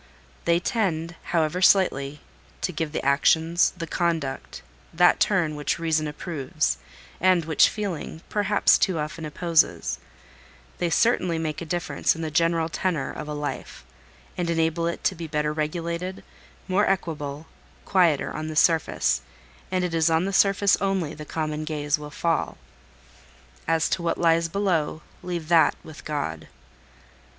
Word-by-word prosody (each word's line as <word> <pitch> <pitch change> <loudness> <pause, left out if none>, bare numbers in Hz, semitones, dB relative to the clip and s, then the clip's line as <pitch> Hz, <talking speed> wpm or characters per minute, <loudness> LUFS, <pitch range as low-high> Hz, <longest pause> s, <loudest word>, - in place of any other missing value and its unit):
They 170 0 +3
tend, 175 -5 -1
however 165 +1 0
slightly, 150 -7 +3 0.4
to - - -1
give 160 -2 -3
the - - -4
actions, 160 +4 +3
the 165 - -4
conduct, 165 -5 -2 0.3
that 175 +2 +4
turn 175 -7 +2
which 150 0 -1
Reason 160 -2 0
approves, 150 -1 -2 0.4
and 185 -3 +3
which 160 -2 +5
Feeling, 180 -6 -5
perhaps, 205 0 +3
too 185 -3 +1
often 155 +1 -4
opposes: 165 +1 +1 0.8
they 175 - 0
certainly 180 -2 +2
make 160 -1 -3
a - - -4
difference 175 +1 0
in 165 - -5
the 155 - -3
general 165 +1 +2
tenour 165 -4 -2
of - - -7
a 150 - -4
life, 145 - -5 0.5
and 175 -1 -1
enable 165 0 +1
it 170 - -4
to - - +2
be 165 -2 -7
better 150 0 -1
regulated, 170 +4 -3 0.4
more 190 +3 +2
equable, 155 -5 -2 0.4
quieter 175 -7 +2
on 155 0 -4
the 155 - -5
surface; 165 0 +2 0.5
and 185 -1 0
it 180 -2 -2
is 165 0 +3
on 165 +2 +2
the 195 - -2
surface 200 0 +4
only 190 -6 0
the 150 - -9
common 155 -1 -3
gaze 150 -1 -1
will 150 0 -8
fall. 165 +2 -1 1.1
As 165 -1 +2
to 185 - -1
what 170 - -1
lies 165 0 +3
below, 165 -5 -1 0.2
leave 175 -3 -4
that 170 -2 +5
with 155 -1 -11
God. 140 - -3
165 Hz, 150 wpm, -25 LUFS, 155-175 Hz, 1.1 s, which